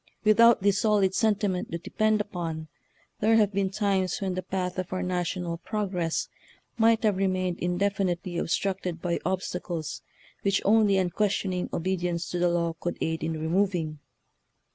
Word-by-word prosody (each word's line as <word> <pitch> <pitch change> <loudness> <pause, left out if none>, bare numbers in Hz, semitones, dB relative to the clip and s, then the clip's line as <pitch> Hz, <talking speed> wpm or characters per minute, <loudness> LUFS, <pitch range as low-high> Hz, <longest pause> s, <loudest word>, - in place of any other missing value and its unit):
Without 220 0 +6
this 200 0 +3
solid 205 -3 +3
sentiment 205 -4 0
to 170 - -2
depend 215 +5 +1
upon, 165 -6 -5 0.5
there 220 +2 +4
have 210 -2 +3
been 195 -1 +1
times 195 -2 0
when 190 -2 -2
the 185 - -2
path 185 0 -3
of 185 - -4
our 185 - -2
national 180 -1 -2
progress 185 -6 -2 0.5
might 225 0 +3
have 210 -3 +2
remained 185 -2 0
indefinitely 180 -1 -1
obstructed 185 -1 -1
by 170 0 -1
obstacles 180 -3 -3 0.4
which 195 -1 +2
only 210 -1 +4
unquestioning 185 0 0
obedience 175 -1 -1
to 175 - -2
the 175 0 +3
law 170 -1 0
could 175 - -3
aid 160 -1 -2
in 160 0 -1
removing. 165 -2 0
185 Hz, 145 wpm, -27 LUFS, 175-200 Hz, 0.5 s, Without